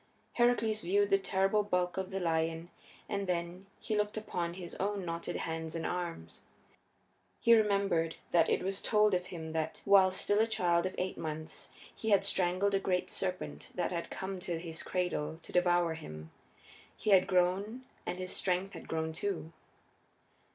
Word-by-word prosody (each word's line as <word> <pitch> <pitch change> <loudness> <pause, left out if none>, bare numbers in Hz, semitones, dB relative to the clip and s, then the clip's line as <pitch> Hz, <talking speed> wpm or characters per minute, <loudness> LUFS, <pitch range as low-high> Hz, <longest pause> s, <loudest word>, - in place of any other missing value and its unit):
Heracles 230 -3 +2
viewed 200 +3 +2
the 195 - +5
terrible 195 +2 +2
bulk 180 -3 0
of 190 -1 -3
the 195 - -3
lion, 165 0 -1 0.4
and 200 -2 -2
then 175 +2 -3
he 215 - -2
looked 210 0 0
upon 175 -5 -3
his 180 -2 -7
own 200 -1 -1
knotted 170 0 -3
hands 160 0 -3
and 165 - -3
arms. 170 - -4 1.0
He 235 - +6
remembered 200 -7 +3 0.2
that 170 -2 +4
it - - +1
was 195 +1 -2
told 210 -2 +3
of 180 0 0
him 165 -3 -6
that, 160 -1 -2
while 195 -1 +7
still 205 +2 +2
a 220 - +4
child 175 -5 +2
of 185 - -7
eight 185 +1 -2
months, 155 0 -5 0.3
he 220 - -3
had 200 -2 +4
strangled 190 +1 +2
a 195 - +3
great 180 -2 0
serpent 185 -1 -3
that 180 - -1
had 170 -1 -3
come 190 0 -4
to 175 -2 -3
his 165 -1 -6
cradle 175 -3 -2
to - - -12
devour 175 -2 +3
him. 80 - -9 0.7
He 215 - 0
had 185 -2 +6
grown 195 +7 +1 0.2
and 180 - -3
his 185 0 -3
strength 185 +1 0
had - - -9
grown 160 0 -2
too. 165 -2 -3
180 Hz, 170 wpm, -32 LUFS, 170-200 Hz, 1.0 s, while